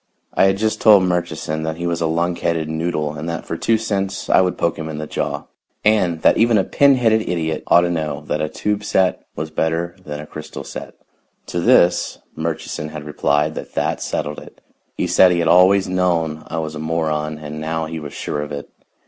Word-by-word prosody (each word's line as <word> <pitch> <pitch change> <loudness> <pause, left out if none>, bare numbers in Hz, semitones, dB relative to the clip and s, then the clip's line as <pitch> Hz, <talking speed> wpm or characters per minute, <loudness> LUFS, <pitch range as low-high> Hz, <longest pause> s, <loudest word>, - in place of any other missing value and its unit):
I - - +4
had 95 0 +3
just 110 +1 -1
told 105 -4 +7
Murchison 85 -3 -1
that 80 0 -2
he 85 - -4
was 85 0 -1
a - - +2
lunkheaded 85 -1 0
noodle 80 -1 -2
and 80 +2 -5
that 85 - -4
for - - -4
two 115 +6 +2
cents 100 -3 -2
I - - +6
would 90 -1 0
poke 85 -1 0
him 80 0 -4
in 75 - -5
the 75 - -4
jaw, - - -3 0.4
and 90 -7 +2
that - - +5
even 115 0 +4
a 95 - +3
pin 140 +5 +4
headed 110 -3 +3
idiot 80 -2 -1
ought 85 - +6
to 85 - 0
know 75 -3 -2
that 75 0 -2
a 75 - -1
tube 105 +4 -2
set 95 -3 +1
was 80 +1 -4
better 80 +2 -1
than 75 0 -6
a 75 - -7
crystal 75 0 -8
set. - - -8 0.5
To 85 - -3
this 85 +1 +3 0.2
Murchison 80 -1 -4
had 75 -1 -7
replied 75 0 0
that - - -8
that - - -1
settled 75 0 -3
it. - - -15 0.4
He - - 0
said 95 - +5
he 90 - +1
had 85 -1 +1
always 95 +3 +5
known 85 -4 0
I 80 - -5
was 80 -1 -3
a 75 - -6
moron, 80 -1 -1
and 75 0 -7
now 80 +1 -2
he 80 +1 -5
was 75 -2 -7
sure 75 - -3
of 75 0 -6
it. 70 0 -6
80 Hz, 215 wpm, -20 LUFS, 75-90 Hz, 0.5 s, told